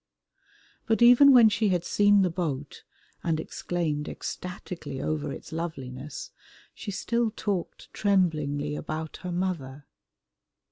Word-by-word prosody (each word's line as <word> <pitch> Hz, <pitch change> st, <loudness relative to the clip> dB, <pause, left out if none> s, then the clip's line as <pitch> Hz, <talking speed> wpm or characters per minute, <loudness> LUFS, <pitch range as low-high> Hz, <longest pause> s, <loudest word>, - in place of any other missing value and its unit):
But 225 Hz, +1 st, +3 dB
even 250 Hz, +4 st, +8 dB
when 240 Hz, -4 st, +8 dB
she 215 Hz, 0 st, +2 dB
had 175 Hz, -2 st, 0 dB
seen 205 Hz, -1 st, +4 dB
the 180 Hz, -, +1 dB
boat 150 Hz, -5 st, -4 dB, 0.4 s
and 165 Hz, -2 st, 0 dB
exclaimed 160 Hz, -3 st, -3 dB
ecstatically 180 Hz, -6 st, -6 dB
over 150 Hz, -1 st, -2 dB
its -, -, -9 dB
loveliness, 150 Hz, -, -6 dB, 0.4 s
she 215 Hz, -, -8 dB
still 235 Hz, +3 st, 0 dB
talked 200 Hz, -4 st, -4 dB
tremblingly 150 Hz, -7 st, +1 dB
about 155 Hz, +1 st, -5 dB
her 180 Hz, -, -6 dB
mother. 155 Hz, -7 st, -3 dB
175 Hz, 120 wpm, -27 LUFS, 150-205 Hz, 0.4 s, even